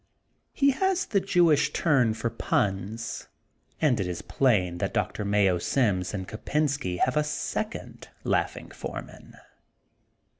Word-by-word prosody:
He 280 0 +3
has 380 +7 +1
the 200 - +1
Jewish 175 -6 +3
turn 130 -9 +3
for 115 +1 -2
puns 105 0 -2 0.5
and 135 -8 +3
it 95 - -1
is 90 -1 -4
plain 95 -10 +1
that - - -2
Doctor 105 - -1
Mayo 100 -3 +2
Sims 95 -4 +1
and 95 -3 -4
Kopensky 140 -4 -1
have 130 - +1
a 150 - +3
second 150 0 -4 0.2
laughing - - -1
f - - -16
oen^an. - - -8
115 Hz, 135 wpm, -27 LUFS, 95-150 Hz, 0.5 s, He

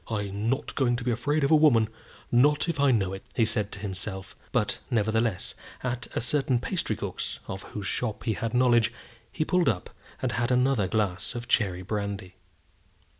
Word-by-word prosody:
"I'm 105 0 -2
not 135 +2 -1
going 120 -3 +2
to 120 - -4
be 125 - +1
afraid 145 +6 0
of 140 - +2
a - - +8
woman 135 -8 +5 0.4
not 145 +7 +4
if 165 -4 -2
I 140 0 +5
know 100 -6 +2
it," 95 - -6
he 115 - +4
said 105 -2 0
to 100 - -6
himself; 95 -1 -4 0.2
but, 115 -4 +1
nevertheless, 110 -3 +1 0.3
at 125 -1 -2
a - - +1
certain 130 +1 +1
pastrycook's, 120 - -3
of 95 +1 -5
whose 105 -2 -7
shop 110 +2 -2
he 110 - +1
had 115 +2 -3
knowledge, 120 -2 +4 0.4
he 155 - -1
pulled 180 +1 +3
up 95 -5 -2 0.3
and 130 - -1
had 120 +3 0
another 125 -5 +3
glass 100 -2 -1
of 120 0 -5
cherry 95 -7 +1
brandy. 100 -1 -3
115 Hz, 180 wpm, -27 LUFS, 100-125 Hz, 0.4 s, a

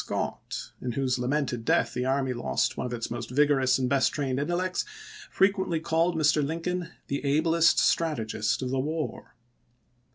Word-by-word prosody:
Scott, - - -4
in 125 -1 -3
whose 130 -1 0
lamented 125 -2 -1
death - - +2
the 125 +1 -2
army 130 -1 +1
lost 120 - -1
one - - -3
of 120 - -5
its 115 -1 -5
most 120 -1 -5
vigorous 135 -1 +3
and 130 -1 0
best 135 0 +2
trained 135 -3 -1
intellects, 175 +5 -1 0.5
frequently 190 -4 +2
called 165 +1 +1
Mr. 150 -1 +3
Lincoln 170 +3 -2
" - - -39
the 140 +1 -3
ablest 160 +4 +3
strategist 110 -7 +1
of 125 - -2
the 135 - 0
war." 150 -4 -4
140 Hz, 165 wpm, -27 LUFS, 125-165 Hz, 0.5 s, vigorous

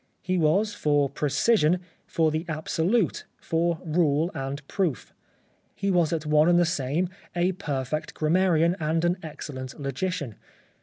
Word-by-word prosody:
He 185 0 0
was 185 +6 +2
for 145 -5 +1
precision, 155 - +2 0.3
for 160 -2 +1
the 155 +1 -1
absolute, 165 +6 0 0.2
for 165 0 0
rule 160 0 +2
and 135 +2 -5
proof. 175 -10 -2 0.6
He 200 -1 -1
was 175 -4 +2
at 160 -2 -2
one 150 +2 +4
and 175 - +5
the 175 - +4
same 155 +1 0
time 185 +1 -11 0.2
a 175 +1 +2
perfect 155 -4 -3
gram 155 +1 0
marian 175 -2 +3
and 160 +2 0
an 175 +1 +2
excellent 135 -5 -7
logician. 140 - -3
160 Hz, 150 wpm, -26 LUFS, 150-180 Hz, 0.6 s, and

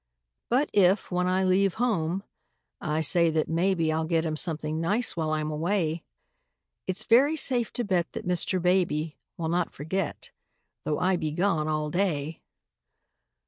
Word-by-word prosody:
But 260 +5 +1
if, 195 0 +3
when 180 0 0
I 185 +1 +1
leave 190 0 +2
home, 195 -6 -1 0.6
I 155 -1 -1
say 170 +2 +4
that 160 -1 0
maybe 165 -1 +1
I'll 160 0 -1
get 165 0 0
him 155 -1 -1
something 155 -1 -1
nice 210 +8 +1
while 160 -2 -1
I'm 155 0 -1
away, 165 0 -1 0.9
It's 185 0 -2
very 270 +7 +4
safe 250 -6 +1
to 245 - -2
bet 185 -5 -1
that - - -6
Mr. 180 +1 0
Baby 175 -4 0 0.2
Will 160 -1 -3
not 175 0 -1
forget, 160 +4 -4 0.5
though 150 - 0
I 185 +1 +1
be 155 -2 -2
gone 160 -1 0
all 155 -1 -1
day. 165 -5 -1
175 Hz, 155 wpm, -27 LUFS, 155-190 Hz, 0.9 s, say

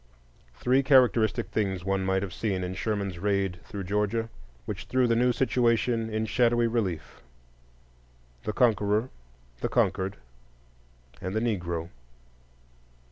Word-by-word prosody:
Three 125 - +2
characteristic 125 -4 +3
things 95 -4 -1
one 95 0 0
might 95 +1 +1
have 95 -3 -5
seen 95 -5 -2
in 90 0 -3
Sherman's 100 -3 -2
raid 100 -2 0
through 100 -3 -6
Georgia, 105 +4 -1 0.4
which - - -5
threw 130 0 +2
the 115 -1 +2
new 125 +2 +3
situation 120 -2 +1
in 110 0 -1
shadowy 120 +1 +2
relief: 110 -8 -2 1.2
the 105 - -2
Conqueror, 105 0 +2 0.5
the - - -1
Conquered, 95 +1 0 1.0
and 95 +3 -4
the - - +2
Negro. 85 -7 -2
105 Hz, 125 wpm, -27 LUFS, 95-115 Hz, 1.2 s, characteristic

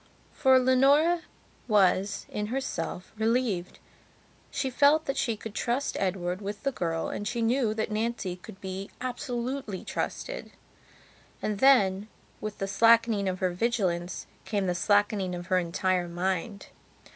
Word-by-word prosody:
For 265 -2 +5
Leonora 275 +7 +4 0.5
was, 200 -2 +2
in 210 0 -3
herself, 250 -6 -4
relieved. 220 -5 0 0.7
She 270 -2 -2
felt 290 +4 +4
that 275 - -1
she 230 -3 0
could 220 0 -8
trust 250 +6 -1
Edward 185 -1 -1
with 205 +3 -5
the 275 - +1
girl 165 -8 -2
and 205 - -4
she 235 -1 -1
knew 230 -2 +1
that 220 0 -2
Nancy 215 -4 -2
could 190 +1 -12
be 190 +1 -6
absolutely 250 -3 -4
trusted. - - -4 0.9
And 210 -2 -2
then, 210 -7 +4 0.3
with 215 -1 -5
the 195 - -2
slackening 225 -1 +4
of 185 0 -4
her 185 -1 +2
vigilance, 180 -4 -1 0.2
came 205 -3 -1
the 180 - +1
slackening 205 0 +2
of 175 0 -6
her 185 - +5
entire 180 +1 0
mind. 185 +3 -3
210 Hz, 140 wpm, -28 LUFS, 185-250 Hz, 0.9 s, For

